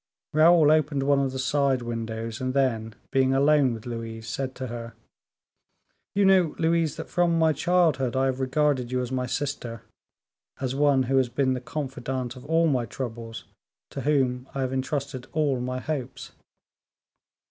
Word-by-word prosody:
Raoul 155 0 +6
opened 150 -3 +2
one 140 0 +3
of 135 -1 0
the 130 - -5
side 135 -1 +1
windows, 115 -1 -4
and 130 +1 -2
then, 115 -5 0 0.2
being 135 -1 +3
alone 140 -1 +4
with 110 - -11
Louise, 115 -1 -6
said 130 +3 -4
to 130 - -5
her: 115 -1 -7 1.2
"You 200 0 +3
know, 185 -5 +4
Louise, 165 -2 +1
that - - -7
from 175 -1 +2
my 160 -1 +3
childhood 155 -9 +2
I 130 0 +2
have 130 -1 -1
regarded 135 -2 +1
you 125 0 0
as 125 - -6
my 125 -1 -1
sister, 125 -4 -4 0.8
as 130 -1 -2
one 140 -1 +3
who 135 +2 +1
has 130 -2 +2
been 130 +1 +1
the 125 - -3
confidante 130 -3 -4
of 125 - -12
all 165 +2 +3
my 130 -7 +1
troubles, 115 -2 -6 0.5
to 135 - -5
whom 130 -3 +1
I 135 - -1
have 130 0 -1
entrusted 135 -1 -3
all 145 -5 +1
my 125 +1 -3
hopes." 130 -3 -5
130 Hz, 170 wpm, -26 LUFS, 125-145 Hz, 1.2 s, Raoul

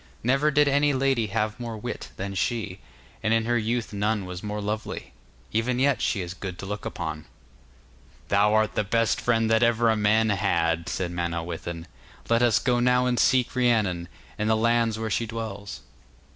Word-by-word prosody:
Never 135 +5 +3
did 150 0 +4
any 145 +1 +3
lady 130 -4 +1
have 105 +2 -2
more 115 -2 -5
wit 105 - -6
than 100 +1 -4
she, 100 -1 -2 0.4
and 115 0 +2
in 115 0 +1
her 120 +1 +1
youth 115 0 -1
none 105 0 0
was 90 0 -6
more 105 0 -4
lovely; 105 +1 -4 0.4
even 115 +3 0
yet 135 +1 +2
she 100 - 0
is 90 0 -5
good 90 -1 -6
to 95 - -7
look 105 +1 -5
upon.' 80 -2 -5 1.0
'Thou 100 +1 +4
art 110 0 +2
the 105 - 0
best 115 +2 +1
friend 115 -2 +2
that 110 0 +4
ever 115 -1 +3
a - - +2
man 110 +1 +3
had,' 85 -5 0
said 90 -2 -2
Manawyddan. 85 -1 -4 0.5
'Let 115 0 +4
us 120 -3 +4
go 120 -1 +1
now 125 +1 +3
to - - +1
seek 130 -1 +2
Rhiannon, 110 -9 +1 0.3
and 105 +1 0
the 110 - +4
lands 115 -1 +2
where 110 -1 -3
she 115 +4 0
dwells. 110 -3 -6
110 Hz, 185 wpm, -26 LUFS, 100-120 Hz, 1.0 s, did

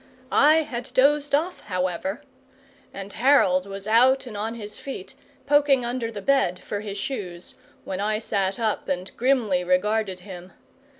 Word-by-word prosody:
I 310 +2 +5
had 245 -3 -6
dozed 285 +1 +4
off, 335 +5 -1
however, 185 +1 -2 0.7
and 195 0 -8
Harold 200 -7 +3
was 195 0 -7
out 255 +5 +4
and 235 -4 -8
on 220 +3 -3
his 210 -2 -8
feet, 270 -9 -7 0.3
poking 280 -3 +3
under 240 -1 -2
the 205 -3 -7
bed 265 -10 +2
for 205 - -4
his 205 -1 -6
shoes, 185 -7 -5 0.3
when 190 - -4
I 215 +1 0
sat 200 -3 -1
up 220 -2 -1
and 185 0 -3
grimly 230 -8 +1
regarded 190 +1 0
him. 185 -1 -10
215 Hz, 155 wpm, -24 LUFS, 190-260 Hz, 0.7 s, I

